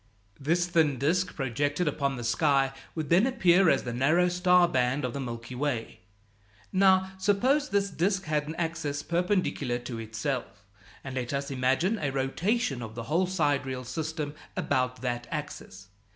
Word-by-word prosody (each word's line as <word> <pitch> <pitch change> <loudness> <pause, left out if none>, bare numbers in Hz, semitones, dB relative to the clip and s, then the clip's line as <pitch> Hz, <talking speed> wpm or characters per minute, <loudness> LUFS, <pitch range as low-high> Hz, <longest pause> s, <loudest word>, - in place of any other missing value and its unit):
This 170 +5 +1
thin 160 -5 +2
disk 175 +8 0
projected 145 +5 -1
upon 140 -2 0
the 120 - -6
sky 135 +2 +2 0.2
would 155 -3 -3
then 190 +8 +5
appear 190 -8 +4
as 135 - +2
the 120 - -4
narrow 155 +9 +3
star 180 0 +4
band 130 -1 0
of 125 - -3
the 140 - -4
Milky 120 -1 -6
Way. 125 -3 -3 0.7
Now, 190 0 +4
suppose 260 +10 +2
this 200 -3 +1
disk 190 +3 0
has 150 -2 -1
an 160 - -5
axis 160 -4 -3
perpendicular 170 -7 0
to 120 -1 -6
itself, 115 -1 -4 0.4
and 135 - -6
let 125 0 -3
us 140 0 -2
imagine 135 - +1
a 145 - -1
rotation 135 - -1
of 110 -1 -7
the 115 - -5
whole 165 +9 +1
sidereal 145 -7 0
system 155 +2 -4 0.2
about 125 -2 0
that 120 -1 -2
axis. 100 -10 -7
145 Hz, 160 wpm, -28 LUFS, 130-180 Hz, 0.7 s, then